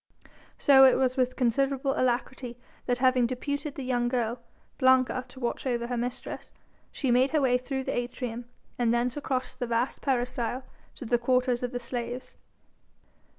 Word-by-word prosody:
So 270 -2 +7
it 265 - +7
was 255 -1 +1
with 255 -1 +1
considerable 270 +2 +1
alacrity 250 0 -1 0.3
that 245 - +1
having 255 -1 +3
deputed 285 +4 -3
the 275 - -5
young 245 -1 0
girl, 240 -1 -1 0.4
Blanca, 260 -1 +3
to 255 +1 -12
watch 240 +2 -2
over 240 -2 0
her 245 +1 -3
mistress 245 +1 -5 0.4
she 265 -4 -1
made 255 +3 +4
her 305 0 +1
way 250 -2 +3
through 265 +1 -3
the - - -2
atrium, 245 -1 -4 0.3
and 235 -2 +3
thence 240 +1 +1
across 260 -3 -2
the 245 - -4
vast 235 +2 -1
peristyle 250 -1 -1 0.3
to 265 - -8
the 240 +1 +2
quarters 250 0 +1
of 245 -1 -2
the 245 - -3
slaves. 245 +1 -5
250 Hz, 165 wpm, -28 LUFS, 240-260 Hz, 0.4 s, So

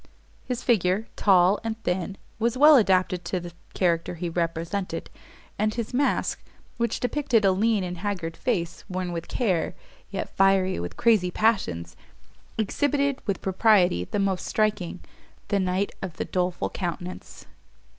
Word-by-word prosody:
His 245 -1 -3
figure, 205 -2 +2
tall 190 0 +4
and 225 -1 -3
thin, 185 +2 -2 0.2
was 235 +2 +1
well 300 +3 +8
adapted 185 -6 +3
to 180 +1 -1
the 175 0 -8 0.2
character 170 -1 +1
he 170 +1 -3
represented, 170 +3 -3 0.5
and 215 0 +1
his 235 -1 -4
mask, 275 +3 +1 0.4
which 235 -1 -1
depictured 245 -4 +1
a 195 - +5
lean 210 +1 +2
and 180 -1 -5
haggard 180 -5 -3
face, 175 -8 -2
worn 185 -1 -3
with 170 -1 -5
care, 190 -9 0 0.3
yet 195 - -5
fiery 195 -1 +3
with 85 0 -6
crazy 215 -6 +3
passions, 90 - 0 0.6
exhibited, 280 +5 0
with 200 - -2
propriety 190 - +3
the - - -3
most 195 -2 0
striking, 210 -5 0 0.5
the 200 - +2
knight 185 +1 0
of 180 -3 -6
the - - -2
doleful 180 -1 -1
countenance. 175 0 -6
190 Hz, 145 wpm, -25 LUFS, 180-220 Hz, 0.6 s, well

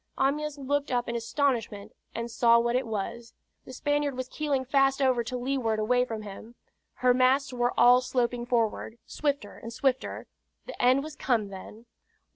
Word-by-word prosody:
Amyas 295 +2 0
looked 285 +1 -1
up 245 -1 0
in 235 - -3
astonishment 230 -3 -1 0.2
and 235 +1 -4
saw 235 +1 +5
what 235 +1 +1
it 255 -1 0
was. 225 +2 -5 0.3
The 260 - -10
Spaniard 290 0 -1
was 255 0 -3
keeling 285 -4 -1
fast 270 +1 +2
over 255 -3 +2
to 250 +2 -4
leeward 245 -3 -1
away 245 +4 +2
from 225 -3 -6
him. 210 +3 -10 0.4
Her 250 0 +3
masts 260 +2 +2
were 245 0 0
all 245 +1 +7
sloping 245 -1 -1
forward, 230 -1 -1
swifter 285 -9 -3
and 230 - -8
swifter 260 +2 -1 0.4
the - - -7
end 255 +3 +4
was 310 -1 -8
come 225 -8 0
then! 200 +4 -11
250 Hz, 170 wpm, -28 LUFS, 230-270 Hz, 0.4 s, all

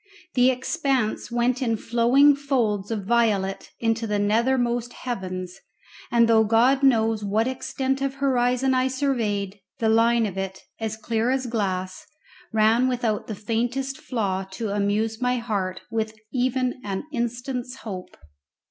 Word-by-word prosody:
The 250 0 +5
expanse 260 -3 -1
went 240 +1 +1
in 230 -3 +1
flowing 245 +6 +4
folds 235 -8 0
of 215 -4 -3
violet 205 -4 +1
into 225 0 0
the 210 -1 0
nethermost 240 +3 +1
heavens, 185 -6 -5 0.5
and 235 -1 +4
though 225 -1 +5
God 235 +5 +3
knows 225 -5 +3
what 215 +3 +1
extent 265 +1 -2
of 275 0 -1
horizon 260 -1 +2
I 255 0 +2
surveyed, 220 -7 -1 0.2
the 225 - +1
line 230 +1 +4
of 195 -2 -4
it, 190 0 -5 0.2
as 220 -1 -3
clear 225 +1 -1
as 265 0 0
glass, 190 -2 -2 0.5
ran 225 +3 +4
without 240 -4 -1
the 215 - -4
faintest 245 +6 -2
flaw 195 -6 -1
to 220 +1 -3
amuse 210 +3 0
my 250 0 +1
heart 200 -6 -2
with 220 -1 -2 0.2
even 255 0 0
an 195 -2 -3
instant's 245 +1 -3
hope. 190 -5 -7
230 Hz, 140 wpm, -24 LUFS, 210-255 Hz, 0.5 s, The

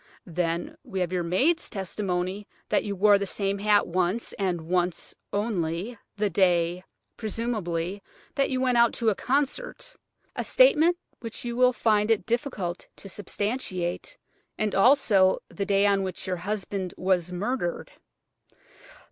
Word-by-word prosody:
Then 170 -1 -2
we 190 - -5
have 180 0 -1
your 180 - +1
maid's 255 - +1
testimony 190 0 -3 0.2
that - - +2
you 200 -1 -3
wore 200 +1 +5
that 200 - -2
same 195 0 -1
hat 205 0 +4
once, 185 +5 -1
and 185 -4 -1
once 175 +1 -1 0.2
only, 200 0 -2 0.2
the 210 0 +1
day, 175 -1 +2 0.3
presumably, 205 -5 -2 0.3
that 275 - +1
you 260 -2 -1
went 250 -2 +2
out 235 -1 +5
to 230 -2 +1
a - - +2
concert–a 295 - -3
statement 350 -9 +5 0.2
which 230 +1 -5
you 235 0 -3
will 250 +1 +5
find 215 -3 +2
it 225 -2 +2
difficult 225 -7 -2
to 195 - -10
substantiate–and 205 0 -4
also 195 -4 +5
the 200 -1 -4
day 200 0 +3
on 200 -1 +3
which 190 -1 -4
your 185 -1 -2
husband 195 0 -4
was 180 -2 +1
murdered." 180 0 -2
200 Hz, 140 wpm, -26 LUFS, 180-230 Hz, 0.3 s, wore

